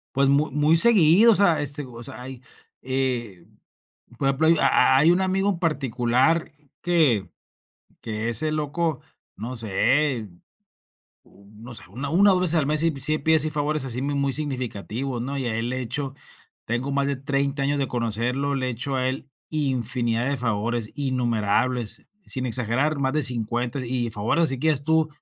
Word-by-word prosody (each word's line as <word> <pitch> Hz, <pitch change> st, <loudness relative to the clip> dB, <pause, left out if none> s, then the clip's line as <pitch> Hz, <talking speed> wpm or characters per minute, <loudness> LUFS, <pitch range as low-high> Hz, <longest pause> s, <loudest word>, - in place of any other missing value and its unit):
Pues 140 Hz, 0 st, +3 dB
mu 145 Hz, +2 st, +2 dB
muy 150 Hz, +3 st, +3 dB
seguido. 205 Hz, +1 st, +6 dB
O -, -, +4 dB
sea, 175 Hz, -7 st, +3 dB
este, 145 Hz, 0 st, -4 dB
o 120 Hz, -2 st, -10 dB
sea, 115 Hz, -, -6 dB
hay, 130 Hz, 0 st, -9 dB, 0.4 s
eh, 125 Hz, -8 st, -2 dB, 0.7 s
por 135 Hz, -, 0 dB
ejemplo, 140 Hz, +4 st, +1 dB
hay 165 Hz, -, +5 dB
hay 140 Hz, +6 st, +5 dB
un 180 Hz, +2 st, +2 dB
amigo 190 Hz, +1 st, +1 dB
en 180 Hz, -4 st, -2 dB
particular 135 Hz, 0 st, +1 dB, 0.3 s
que 150 Hz, -, +2 dB, 0.7 s
que 110 Hz, +1 st, -3 dB
ese 120 Hz, +7 st, +1 dB
loco, 155 Hz, 0 st, -2 dB, 0.4 s
no 120 Hz, +4 st, -6 dB
sé. 115 Hz, +3 st, +1 dB, 1.0 s
U 100 Hz, 0 st, -21 dB
no 120 Hz, +2 st, -10 dB
sé, -, -, -4 dB
una 135 Hz, +7 st, -5 dB
una, 195 Hz, +6 st, +4 dB
o -, -, +3 dB
dos 180 Hz, -, +1 dB
veces 175 Hz, -2 st, +3 dB
al 150 Hz, -, +2 dB
mes, 150 Hz, +1 st, +1 dB
sí 165 Hz, 0 st, +2 dB
sí 155 Hz, +4 st, +1 dB
pide 160 Hz, 0 st, +3 dB
así 155 Hz, 0 st, +1 dB
favores 150 Hz, -1 st, -1 dB
así 125 Hz, -1 st, -3 dB
mu 140 Hz, +2 st, -2 dB
muy 140 Hz, -1 st, 0 dB
significativos, 130 Hz, -3 st, -3 dB
¿no? 135 Hz, +4 st, -4 dB
Y 135 Hz, -, -2 dB
el 115 Hz, +2 st, -1 dB
hecho 130 Hz, +2 st, -3 dB, 0.5 s
Tengo 120 Hz, +4 st, -2 dB
más 140 Hz, 0 st, +1 dB
de 140 Hz, -, -1 dB
30 140 Hz, +1 st, -1 dB
años 145 Hz, +1 st, 0 dB
de 135 Hz, -2 st, -1 dB
conocerlo. 120 Hz, +4 st, -1 dB
Le 130 Hz, -2 st, -1 dB
he -, -, -1 dB
hecho 125 Hz, +4 st, -4 dB
a 130 Hz, 0 st, 0 dB
él 130 Hz, +1 st, -5 dB, 0.2 s
infinidad 125 Hz, -4 st, -1 dB
de 140 Hz, -, 0 dB
favores, 115 Hz, -1 st, -2 dB
innumerables, 125 Hz, -3 st, -1 dB, 0.2 s
sin 130 Hz, -1 st, -3 dB
exagerar 125 Hz, +6 st, 0 dB
más 135 Hz, -1 st, 0 dB
de 155 Hz, -, +1 dB
50. 120 Hz, +2 st, -1 dB
Y 120 Hz, -1 st, -1 dB
favores 110 Hz, +10 st, +1 dB
así 135 Hz, -, 0 dB
que 160 Hz, +5 st, 0 dB
digas 145 Hz, -3 st, +1 dB
tú, 160 Hz, +1 st, +2 dB
135 Hz, 180 wpm, -24 LUFS, 120-150 Hz, 1.0 s, seguido